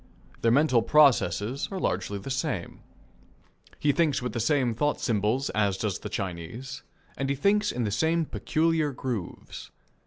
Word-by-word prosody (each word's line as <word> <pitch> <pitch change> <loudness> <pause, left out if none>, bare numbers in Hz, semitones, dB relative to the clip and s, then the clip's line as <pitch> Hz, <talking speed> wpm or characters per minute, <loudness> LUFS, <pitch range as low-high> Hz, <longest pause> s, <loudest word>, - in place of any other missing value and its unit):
Their 115 - +3
mental 130 -1 +4
processes 135 -2 +3
are 195 - -4
largely 100 - -1
the 100 +7 -6
same. 130 - -3 1.0
He 145 - +2
thinks 150 0 +1
with 125 0 -4
the 120 - -2
same 125 0 +2
thought 145 +6 0
symbols 115 +4 0
as 100 -3 +1
does 100 -3 -2
the 105 - -6
Chinese, 100 +8 -5 0.4
and 135 0 -2
he 140 - +1
thinks 205 +8 +2
in 120 - -2
the 105 - -1
same 160 +8 +1
peculiar 155 -1 0
grooves. 120 -8 -6
130 Hz, 155 wpm, -27 LUFS, 110-150 Hz, 1.0 s, mental